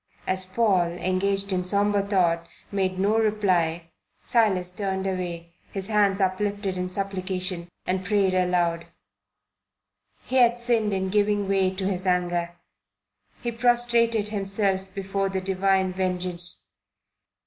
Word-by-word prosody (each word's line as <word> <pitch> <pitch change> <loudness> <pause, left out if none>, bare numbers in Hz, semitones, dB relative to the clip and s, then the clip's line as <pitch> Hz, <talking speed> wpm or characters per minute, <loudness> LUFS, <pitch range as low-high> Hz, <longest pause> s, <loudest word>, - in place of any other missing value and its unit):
As 185 0 -1
Paul, 185 -4 +2
engaged 195 +2 -1
in 180 -1 0
sombre 205 +2 +2
thought, 175 -4 +1 0.2
made 190 -2 -1
no 205 +4 +2
reply, 180 -6 +1 0.3
Silas 195 -7 +2
turned 190 -1 -2
away, 175 -3 -4 0.2
his 195 +1 -4
hands 205 -2 +3
uplifted 200 +1 -1
in 180 0 -3
supplication, 185 -2 -2 0.2
and 185 +1 -1
prayed 195 -1 +2
aloud. 175 -2 +1 1.4
He 260 - -1
had 240 -1 +5
sinned 235 -3 +1
in 190 -1 -1
giving 205 0 +1
way 195 -1 +2
to 190 0 -3
his 190 -1 -1
anger. 175 -1 0 0.9
He 240 - -1
prostrated 235 -2 +2
himself 195 -2 0
before 195 0 -1
the 190 0 -2
divine 190 0 +1
vengeance. 180 -1 -2
190 Hz, 125 wpm, -25 LUFS, 180-205 Hz, 1.4 s, had